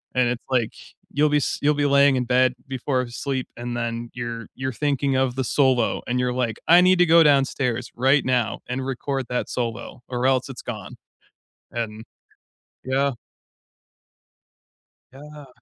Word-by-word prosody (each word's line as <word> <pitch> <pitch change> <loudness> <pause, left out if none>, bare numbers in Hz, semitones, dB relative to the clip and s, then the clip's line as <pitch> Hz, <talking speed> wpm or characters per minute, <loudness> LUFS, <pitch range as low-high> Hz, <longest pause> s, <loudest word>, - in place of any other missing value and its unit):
And 125 -1 +3
it's 125 -1 -3
like, 120 -4 0 0.4
you'll 150 +2 +2
be 150 - +3
s 145 - -1
you'll 150 +1 +3
be 145 0 +1
laying 140 -1 +5
in 125 - 0
bed 125 +1 +3
before 130 -1 -2
sleep, 130 +3 -3
and 120 0 -5
then 120 0 -3
you're 120 -2 -5
you're 130 0 -3
thinking 140 0 0
of 130 -1 +1
the 130 - -1
solo 130 -2 +2
and 125 +1 0
you're 125 0 0
like, 120 -3 -1
"I 175 +2 +8
need 185 0 +5
to 180 - +6
go 165 0 +6
downstairs 135 -4 +1
right 135 +4 +3
now 125 -3 0
and 125 +2 -3
record 135 -1 -3
that 125 - -2
solo 120 0 -4
or 125 0 -2
else 130 0 +1
it's 130 - -8
gone." 105 -5 -7 0.8
And 110 -1 -4 0.8
yeah. 135 +2 +1 2.0
Yeah. 150 +1 -12
130 Hz, 160 wpm, -23 LUFS, 120-140 Hz, 2.0 s, I